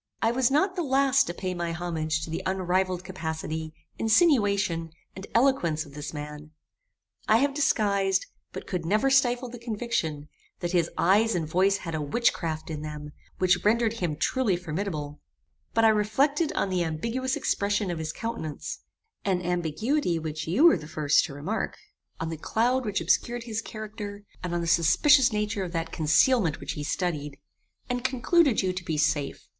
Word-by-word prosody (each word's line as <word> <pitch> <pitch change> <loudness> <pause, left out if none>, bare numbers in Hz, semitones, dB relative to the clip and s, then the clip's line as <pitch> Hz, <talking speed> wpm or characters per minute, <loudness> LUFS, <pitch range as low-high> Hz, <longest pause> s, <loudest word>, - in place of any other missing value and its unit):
I 225 - +2
was 245 0 +2
not 370 +8 +2
the 360 - -1
last 275 -2 +3
to - - -3
pay 185 0 -3
my 170 -1 -3
homage 160 -2 -2
to 160 - -6
the 165 - -3
unrivalled 185 -1 0
capacity, 160 -3 -4 0.3
insinuation, 205 - +3 0.3
and 195 +1 -8
eloquence 205 - +2
of 140 - -15
this 150 +1 -6
man. 150 0 -7 0.8
I 220 - +5
have 275 +3 +1
disguised, 205 -10 +1 0.3
but - - -7
could 180 -3 -3
never 215 +10 +2
stifle 250 -2 +3
the 245 0 -9
conviction, 215 - -3 0.3
that 175 -1 -2
his 170 -2 +2
eyes 210 +5 +3
and 165 -3 -1
voice 190 +5 +2
had 165 - -4
a 155 - -2
witchcraft 160 -2 -1
in 150 -1 -4
them, 150 -1 -7 0.3
which 180 -1 +2
rendered 225 +1 +3
him 175 -9 -2
truly 210 - +1
formidable: 155 -4 -4 0.5
but 225 0 +4
I - - +7
reflected 270 +9 +2
on 195 - -1
the 180 -1 +1
ambiguous 230 +12 -2
expression 200 -1 0
of 170 - -4
his 155 -1 -3
countenance 225 -8 -5 0.4
an 185 -2 0
ambiguity 180 - 0
which 155 0 -5
you 190 - +2
were 335 - +7
the 150 -2 -10
first 150 -2 +2
to 140 - -8
remark; 185 +11 -3 0.4
on 165 - -3
the 165 - -4
cloud 245 - 0
which 205 -4 -1
obscured 235 +8 +1
his 225 -2 -3
character; 210 -2 -7 0.2
and 175 -1 -3
on 170 - 0
the - - -2
suspicious 235 - +5
nature 210 -1 -1
of 180 -1 -6
that 165 -1 -2
concealment 165 - +3
which - - -4
he 150 - -5
studied; 150 -4 -2 0.5
and 245 -1 -2
concluded 260 - +3
you 185 -1 0
to 185 -1 -5
be 160 -2 -2
safe. 150 -2 0
185 Hz, 175 wpm, -27 LUFS, 160-230 Hz, 0.8 s, I